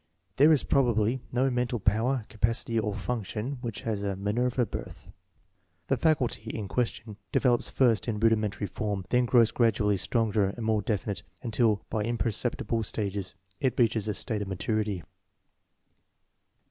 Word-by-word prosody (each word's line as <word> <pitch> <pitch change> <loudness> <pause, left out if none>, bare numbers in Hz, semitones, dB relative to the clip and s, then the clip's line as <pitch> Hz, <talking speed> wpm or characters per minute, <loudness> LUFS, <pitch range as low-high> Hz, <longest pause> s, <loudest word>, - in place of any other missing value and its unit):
There 150 +4 +7
is 150 - +4
probably 120 -2 +2
no 130 +2 +2
mental 125 -1 -1
power, 110 +5 +1
capacity, 115 +1 0
or 105 -2 -2
function 115 +4 -3
which 115 -4 -5
has 110 -3 -2
a 100 -1 -2
Minerva 120 +6 0
birth, - - -8 0.8
The 135 - +4
"faculty" 130 -6 +1
in 110 -3 -4
question 115 -2 -2
develops 120 -3 +2
first 120 -5 +2
in 110 -3 -1
rudimentary 110 -2 +1
form, 100 0 -3
then 125 0 +3
grows 115 -2 +4
gradually 105 -4 +2
stronger 105 +1 +1
and 115 - -4
more 110 -1 +2
definite 100 -1 -2 0.2
until, 115 -3 +1
by 110 - 0
imperceptible 115 +1 -1
stages, 100 -3 -3 0.2
it 130 - 0
reaches 110 -3 +2
a 105 - -1
state 110 -3 -2
of 100 - -3
maturity. 100 -1 -1
110 Hz, 145 wpm, -28 LUFS, 105-120 Hz, 0.8 s, There